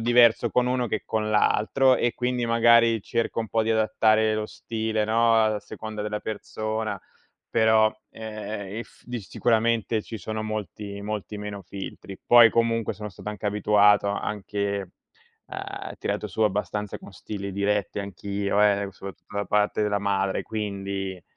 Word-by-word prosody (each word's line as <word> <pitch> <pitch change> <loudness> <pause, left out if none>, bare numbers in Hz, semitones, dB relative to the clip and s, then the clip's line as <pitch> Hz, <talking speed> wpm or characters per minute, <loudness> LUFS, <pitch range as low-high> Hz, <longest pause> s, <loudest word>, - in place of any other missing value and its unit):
diverso 120 0 +5
con 125 0 +2
uno 125 -1 0
che 110 - -2
con 110 -1 -1
l'altro 120 +5 +3
e 120 - 0
quindi 125 0 -1
magari 115 0 +5
cerco 115 +3 -2
un 115 - -1
po' 115 +1 +1
di 110 - -1
adattare 110 0 +3
lo 110 0 -1
stile, 110 -1 -2
no, 115 +1 +3
a 110 -2 +2
seconda 110 -1 -7
della 105 0 -2
persona, 110 -1 -4 0.5
però, 110 -1 +4 0.2
ehm, 110 -2 -6
eff 120 - -10
di 120 -2 -5
sicuramente 115 +2 +1
ci 115 - -7
sono 110 +3 -4
molti 105 -1 -5
molti 105 0 -5
meno 105 -1 -6
filtri. 95 +1 -8
Poi 120 -1 +8
comunque 115 -1 +1
sono 105 +1 -7
stato 100 0 -9
anche 105 0 -5
abituato 105 0 +4
anche, 100 -1 -3 0.5
ehm, - - -6
tirato - - -2
su - - -7
abbastanza 105 0 -1
con - - -13
stili 100 +1 -6
diretti 100 +1 0
anch'io 100 +1 -2
eh, 100 -1 +3
soprattutto 100 +1 -10
da 100 - 0
parte 105 +1 +1
della 105 -1 0
madre 100 -1 0
quindi 100 -3 -4
105 Hz, 150 wpm, -25 LUFS, 100-110 Hz, 0.5 s, Poi